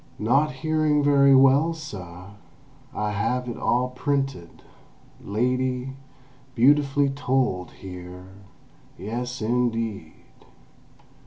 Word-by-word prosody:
"Not 135 Hz, +8 st, +2 dB
hearing 155 Hz, +1 st, +1 dB
very 140 Hz, -1 st, +5 dB
well, 135 Hz, +5 st, +4 dB
suh, 95 Hz, -, -9 dB, 0.6 s
I 105 Hz, 0 st, -2 dB
have 125 Hz, +5 st, -1 dB
it 120 Hz, -, -4 dB
all 125 Hz, +1 st, 0 dB
printed, 135 Hz, -7 st, -3 dB, 0.6 s
lady—beautifully 130 Hz, +3 st, 0 dB
told 130 Hz, -9 st, -1 dB
here—yes, 95 Hz, +5 st, -9 dB
indeed!" 115 Hz, -7 st, -2 dB
125 Hz, 75 wpm, -24 LUFS, 105-135 Hz, 0.6 s, very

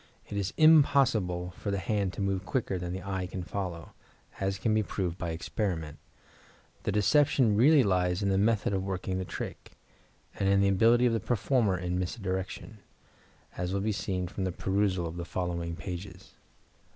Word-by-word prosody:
It -, -, -5 dB
is 100 Hz, -1 st, -1 dB
impossible 120 Hz, -, +4 dB
for 100 Hz, -, -6 dB
the 100 Hz, -, 0 dB
hand 100 Hz, -1 st, -1 dB
to -, -, -5 dB
move 95 Hz, -1 st, -1 dB
quicker 95 Hz, -3 st, -2 dB
than 90 Hz, 0 st, -4 dB
the 95 Hz, 0 st, -5 dB
eye 95 Hz, -1 st, -3 dB
can 90 Hz, 0 st, -5 dB
follow, 90 Hz, -3 st, -5 dB, 0.5 s
as 95 Hz, 0 st, -1 dB
can 110 Hz, +3 st, 0 dB
be 110 Hz, -, +3 dB
proved 95 Hz, -3 st, -3 dB
by 85 Hz, -, -3 dB
experiment. 80 Hz, -2 st, -3 dB, 0.8 s
The -, -, -1 dB
deception 120 Hz, +3 st, +3 dB
really 140 Hz, +6 st, +6 dB
lies 90 Hz, -2 st, +1 dB
in 100 Hz, -, +1 dB
the 95 Hz, -, +2 dB
method 105 Hz, -1 st, +2 dB
of 95 Hz, -, 0 dB
working 95 Hz, -1 st, -3 dB
the 95 Hz, -, -3 dB
trick, -, -, -7 dB, 0.7 s
and 95 Hz, -, +2 dB
in 100 Hz, 0 st, +4 dB
the 100 Hz, 0 st, +4 dB
ability 115 Hz, +5 st, +4 dB
of 120 Hz, -, +3 dB
the 115 Hz, -, +1 dB
performer 110 Hz, -2 st, +1 dB
in 90 Hz, +1 st, -2 dB
misdirection, 95 Hz, +2 st, -4 dB, 0.8 s
as 90 Hz, +2 st, -2 dB
will 100 Hz, -, 0 dB
be 110 Hz, +2 st, 0 dB
seen 95 Hz, -3 st, -2 dB
from 95 Hz, +1 st, -3 dB
a -, -, -2 dB
perusal 95 Hz, 0 st, 0 dB
of 85 Hz, +1 st, -6 dB
the 85 Hz, -, -3 dB
following 85 Hz, -1 st, -3 dB
pages. 90 Hz, +2 st, -8 dB
95 Hz, 180 wpm, -29 LUFS, 90-105 Hz, 0.8 s, really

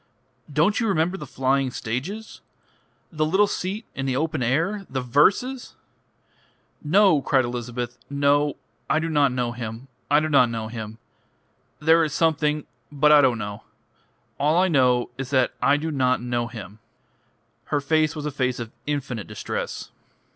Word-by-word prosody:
Don't 160 Hz, +8 st, +2 dB
you 230 Hz, -, 0 dB
remember 180 Hz, -1 st, +1 dB
the -, -, -7 dB
flying 135 Hz, 0 st, 0 dB
stages? 140 Hz, -, -5 dB, 0.7 s
The 155 Hz, -2 st, -1 dB
little 190 Hz, +7 st, +3 dB
seat 200 Hz, +2 st, -4 dB
in 135 Hz, 0 st, -3 dB
the 130 Hz, -, 0 dB
open 155 Hz, 0 st, -1 dB
air? 165 Hz, -, 0 dB
The 130 Hz, 0 st, -2 dB
verses 200 Hz, -, +1 dB, 0.5 s
" -, -, -38 dB
"No," 180 Hz, -1 st, +4 dB
cried 130 Hz, -2 st, +2 dB
Elizabeth, 120 Hz, 0 st, -5 dB
"no. 145 Hz, +1 st, +2 dB, 0.3 s
I 155 Hz, -, +3 dB
do 165 Hz, +1 st, -1 dB
not 145 Hz, -4 st, +3 dB
know 125 Hz, -1 st, -1 dB
him. 120 Hz, +2 st, -7 dB, 0.2 s
I 145 Hz, +1 st, +5 dB
do 155 Hz, -, -1 dB
not 140 Hz, -5 st, +4 dB
know 110 Hz, -1 st, -4 dB
him. 110 Hz, -1 st, -7 dB, 0.8 s
There 160 Hz, +2 st, +4 dB
is 150 Hz, -2 st, -2 dB
something.... 155 Hz, -2 st, +1 dB, 0.3 s
But 150 Hz, +1 st, +3 dB
I 150 Hz, -1 st, +8 dB
don't 130 Hz, -4 st, +3 dB
know. 105 Hz, -1 st, -6 dB, 0.8 s
All 150 Hz, +3 st, +2 dB
I 185 Hz, +1 st, +3 dB
know 125 Hz, -5 st, +2 dB
is 135 Hz, -1 st, -4 dB
that 130 Hz, -3 st, +2 dB
I 140 Hz, +1 st, +4 dB
do 160 Hz, +2 st, -3 dB
not 130 Hz, -3 st, +1 dB
know 120 Hz, -1 st, -2 dB
him." 110 Hz, -3 st, -10 dB, 0.9 s
Her 145 Hz, -, 0 dB
face 155 Hz, +1 st, +1 dB
was 150 Hz, -1 st, -5 dB
a 150 Hz, -, -2 dB
face 130 Hz, -2 st, -1 dB
of 115 Hz, -2 st, -6 dB, 0.2 s
infinite 135 Hz, -7 st, -3 dB
distress. 105 Hz, 0 st, -5 dB
140 Hz, 160 wpm, -24 LUFS, 125-155 Hz, 0.9 s, I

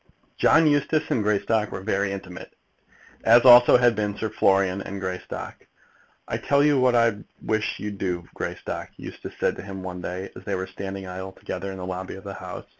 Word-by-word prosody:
John 160 Hz, +1 st, +5 dB
Eustace 150 Hz, +1 st, +1 dB
and 115 Hz, -, +2 dB
Greystock 105 Hz, +1 st, +1 dB
were 95 Hz, -, -5 dB
very 100 Hz, -1 st, 0 dB
intimate, 95 Hz, -2 st, -8 dB, 0.7 s
as 120 Hz, +2 st, +6 dB
also 120 Hz, -1 st, +9 dB
had 120 Hz, -1 st, +3 dB
been 105 Hz, -1 st, -2 dB
Sir 110 Hz, -2 st, -3 dB
Florian 95 Hz, -2 st, +2 dB
and 100 Hz, 0 st, -6 dB
Greystock. 95 Hz, -1 st, -6 dB, 0.6 s
"I -, -, -2 dB
tell 140 Hz, 0 st, +2 dB
you 145 Hz, -2 st, +4 dB
what 125 Hz, -1 st, +3 dB
I 115 Hz, -3 st, +3 dB, 0.3 s
wish 110 Hz, 0 st, -1 dB
you'd 105 Hz, -1 st, -6 dB
do, 90 Hz, -2 st, -3 dB
Greystock," -, -, -5 dB
Eustace -, -, -9 dB
said -, -, +1 dB
to -, -, -6 dB
him 95 Hz, -1 st, -8 dB
one 90 Hz, -1 st, -6 dB
day, 90 Hz, +2 st, -5 dB
as -, -, -11 dB
they 100 Hz, -, -2 dB
were 95 Hz, 0 st, -3 dB
standing 95 Hz, 0 st, -7 dB
idly 95 Hz, +1 st, -7 dB
together 95 Hz, +2 st, -5 dB
in 95 Hz, -, -7 dB
the 90 Hz, -, -6 dB
lobby 95 Hz, 0 st, -5 dB
of 95 Hz, -, -11 dB
the 100 Hz, -, -6 dB
House. -, -, -8 dB
100 Hz, 195 wpm, -24 LUFS, 95-115 Hz, 0.7 s, also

